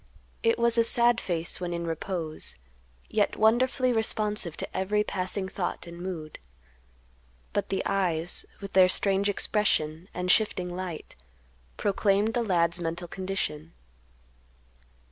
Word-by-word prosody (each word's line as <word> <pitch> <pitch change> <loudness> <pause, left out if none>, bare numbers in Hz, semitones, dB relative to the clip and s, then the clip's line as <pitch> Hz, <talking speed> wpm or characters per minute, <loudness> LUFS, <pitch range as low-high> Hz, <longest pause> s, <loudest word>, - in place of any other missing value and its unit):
It 460 0 +3
was 235 0 +2
a - - +6
sad 235 0 +4
face 170 0 -1
when 175 -1 -2
in 170 0 -3
repose, 165 - -4 0.5
yet - - +1
wonderfully 250 +3 +3
responsive 210 -6 0
to - - -5
every 205 +3 +1
passing 190 0 -3
thought 185 -1 -3
and 170 0 -9
mood. 170 -4 -6 1.1
But - - -1
the 195 - -1
eyes, 175 -4 0 0.2
with 200 -1 -7
their 185 -1 +7
strange 195 +1 +2
expression, 185 -5 0
and 180 0 0
shifting 180 -5 +1
light, 180 -4 -6 0.6
proclaimed 205 +2 +2
the 240 - +1
lad's 175 -5 +2
mental 170 +1 -3
condition. 170 -4 -4
190 Hz, 125 wpm, -28 LUFS, 170-210 Hz, 1.1 s, their